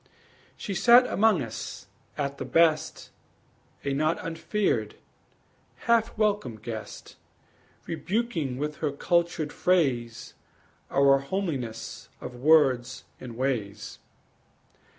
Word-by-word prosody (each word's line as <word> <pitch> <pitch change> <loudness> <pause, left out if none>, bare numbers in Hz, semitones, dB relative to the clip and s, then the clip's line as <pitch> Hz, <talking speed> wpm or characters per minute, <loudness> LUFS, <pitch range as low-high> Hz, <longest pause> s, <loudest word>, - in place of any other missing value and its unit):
She 200 - -5
sat 240 +6 +6
among 215 - +3
us, 115 -2 -7 0.3
at 140 -1 -3
the - - -2
best, 165 -2 +1 0.7
A 140 - 0
not 155 +4 +1
unfeared, 165 - -1 0.9
half 230 -1 +2
welcome 205 - 0
guest, 110 0 -8 0.7
Rebuking 170 - -2
with 150 +2 -3
her 150 -2 -1
cultured 170 +1 0
phrase 125 -11 0 0.6
Our 140 0 +4
homeliness 140 - -4
of 125 - -7
words 130 -2 +3 0.2
and 120 -3 -9
ways. 110 -6 -3
150 Hz, 95 wpm, -27 LUFS, 125-175 Hz, 0.9 s, sat